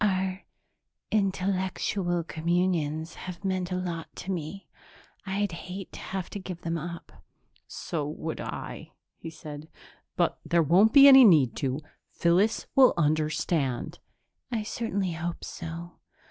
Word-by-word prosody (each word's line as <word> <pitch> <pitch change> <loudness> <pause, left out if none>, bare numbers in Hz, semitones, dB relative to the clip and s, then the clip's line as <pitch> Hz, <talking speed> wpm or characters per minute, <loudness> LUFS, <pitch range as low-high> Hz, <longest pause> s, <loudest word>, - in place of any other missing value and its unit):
Our 190 -1 0 0.7
intellectual 190 -3 0
communions 160 -1 -1
have 185 +1 -8
meant 185 -1 -1
a - - 0
lot 175 -3 -3
to 195 - -5
me. 180 +2 -5 0.6
I'd 200 +1 0
hate 180 +2 -7
to - - -9
have 190 -2 -4
to 205 - -5
give 185 -2 -7
them 165 -1 -2
up." 170 +1 -7 0.4
"So 150 -4 -4
would 160 +1 -5
I," - - -7 0.3
he 165 - -7
said. 155 -1 -9 0.5
"But - - +1
there 170 -1 +2
won't 185 +9 +5
be 280 +1 +9
any 265 -1 +10
need 150 - +5
to. 135 +2 -1 0.3
Phyllis 185 +6 +2
will 265 -2 +6
understand." 155 -3 0 0.5
"I 225 -3 -1
certainly 200 -4 -2
hope 170 +1 -4
so. 170 +1 -7
175 Hz, 135 wpm, -27 LUFS, 160-190 Hz, 0.7 s, any